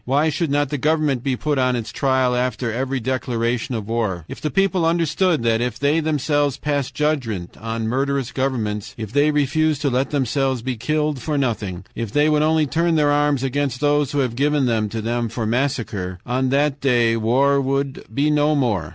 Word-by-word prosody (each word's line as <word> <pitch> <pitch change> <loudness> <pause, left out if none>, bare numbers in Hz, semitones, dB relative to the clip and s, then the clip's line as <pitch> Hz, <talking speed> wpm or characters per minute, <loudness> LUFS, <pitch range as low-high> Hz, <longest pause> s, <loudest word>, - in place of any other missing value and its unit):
"Why 145 +5 +2
should 160 +1 -1
not 145 0 +1
the 145 -1 -3
government 150 -3 +1
be 135 0 -1
put 145 +2 -1
on 125 -1 +2
its 115 -2 -4
trial 130 0 +1
after 125 -1 -1
every 130 +2 -2
declaration 120 -1 -1
of 105 -3 -4
war? 105 -8 -2
IF - - -9
THE 150 - -1
PEOPLE 195 0 +1
UNDERSTOOD 165 -1 +1
THAT, 115 0 +2
IF 120 -2 -2
THEY 145 +4 +2
THEMSELVES 145 -3 0
PASSED 145 -3 -2
JUDGMENT 125 - -1
ON 115 0 -3
MURDEROUS 135 +1 -1
GOVERNMENTS, 115 -6 -2
IF 110 -1 -6
THEY 145 +2 +4
REFUSED 150 +1 +1
TO 140 - +1
LET 130 +2 0
THEMSELVES 135 -2 0
BE 130 0 -2
KILLED 150 +2 -1
FOR 150 -2 -2
NOTHING, 105 -9 -2
IF 115 -3 -4
THEY 150 +4 +3
WOULD 150 -1 +3
ONLY 155 0 +3
TURN 165 +4 +1
THEIR 150 -2 +3
ARMS 145 -2 +2
AGAINST 135 -1 -1
THOSE 145 -2 +2
WHO - - -1
HAVE 125 -3 -2
GIVEN 145 +1 +2
THEM 110 -3 0
TO 110 +1 -4
THEM 120 0 -1
FOR 115 0 -3
MASSACRE, 110 -7 -2
ON 130 +1 0
THAT 140 +1 +1
DAY 120 -4 +3
WAR 135 +5 +2
WOULD 135 0 -2
BE 145 +2 +1
NO 150 +1 +3
MORE. 105 - 0
135 Hz, 200 wpm, -21 LUFS, 115-145 Hz, -, THEY